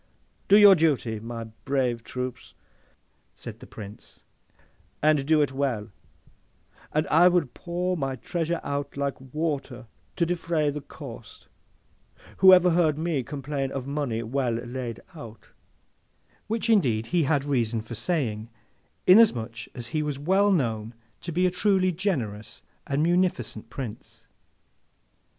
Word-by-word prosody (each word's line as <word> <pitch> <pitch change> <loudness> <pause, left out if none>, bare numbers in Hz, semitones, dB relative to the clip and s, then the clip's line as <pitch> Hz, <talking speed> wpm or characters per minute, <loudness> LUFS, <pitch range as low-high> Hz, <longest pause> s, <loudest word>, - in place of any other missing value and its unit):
Do 200 - +7
your 205 -2 +9
duty 145 - +1
by 110 - -12
my 115 -1 -5 0.2
brave 130 -4 0
troops,' 125 0 -6 0.8
said - - -9
the - - -12
Prince, 105 -1 -11 0.8
'and 150 -2 +3
do 155 -1 +4
it 145 - -2
well, 130 -6 -2 1.0
and 155 +1 +1
I 170 +4 +6
will 175 -3 +3
pour 175 +7 -3
my 135 -5 -2
treasure 170 +6 -2
out 140 0 -4
like 140 -2 -2
water, 135 -3 -4 0.3
to 170 - +1
defray 165 -3 0
the 150 +1 -5
cost. 120 -8 -11 0.9
Who 190 0 +8
ever 180 -1 +6
heard 165 -3 +2
ME 160 -3 -1
complain 140 +1 -4
of 135 -2 -4
money 140 -5 -2
well 125 +1 -1
laid 120 0 -5
out!' 115 -8 -11 1.0
Which 225 +2 -2
indeed 130 - +3
he 170 -4 +3
had 140 -1 +1
reason 120 -5 0
for 115 - -8
saying, 115 - -2 0.6
inasmuch 125 - +4
as 120 -3 -6
he 155 - +1
was 150 -2 -3
well 190 +8 +2
known 115 - -1 0.3
to - - -5
be 180 +3 +1
a 180 - +2
truly 185 0 +2
generous 130 - -3 0.2
and 140 +2 0
munificent 170 -11 0
Prince. 120 -4 -8
140 Hz, 135 wpm, -26 LUFS, 120-170 Hz, 1.0 s, your